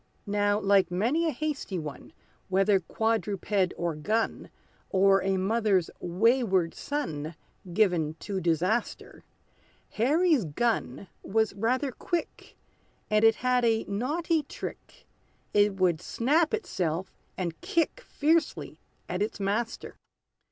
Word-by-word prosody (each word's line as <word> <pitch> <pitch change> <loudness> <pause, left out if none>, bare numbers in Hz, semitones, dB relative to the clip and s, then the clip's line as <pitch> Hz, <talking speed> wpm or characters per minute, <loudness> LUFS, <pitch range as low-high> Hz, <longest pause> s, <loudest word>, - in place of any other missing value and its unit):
Now, 205 0 +1
like 195 -3 +3
many 240 - +1
a - - +1
hasty 290 -8 -3
one, 150 -4 -7 0.4
Whether 195 +1 +3
quadruped 205 -1 0
or 170 -1 -1
gun, 215 +10 -1 0.4
Or 195 0 +4
a 195 0 0
mother's 195 -2 +1
wayward 190 -1 +2
son 165 - -4 0.4
Given 170 -6 +2
to 195 -2 -3
disaster, 180 +8 -1 0.7
Harry's 295 - +2
gun 185 - -1
was 220 0 0
rather 250 +7 0
quick; 340 +6 -4 0.5
And 215 0 +3
it 225 -1 +6
had 250 0 +1
a 225 -1 +2
naughty 305 +10 0
trick, 285 - -9 0.5
It 205 -1 +4
would 180 -4 +1
snap 300 - +1
itself, 185 - -2 0.2
and 170 -3 -4
kick 335 +9 0
Fiercely 320 +2 0 0.3
at 180 +2 -3
its 210 +1 -2
master. 210 +4 -2
205 Hz, 115 wpm, -28 LUFS, 185-245 Hz, 0.7 s, it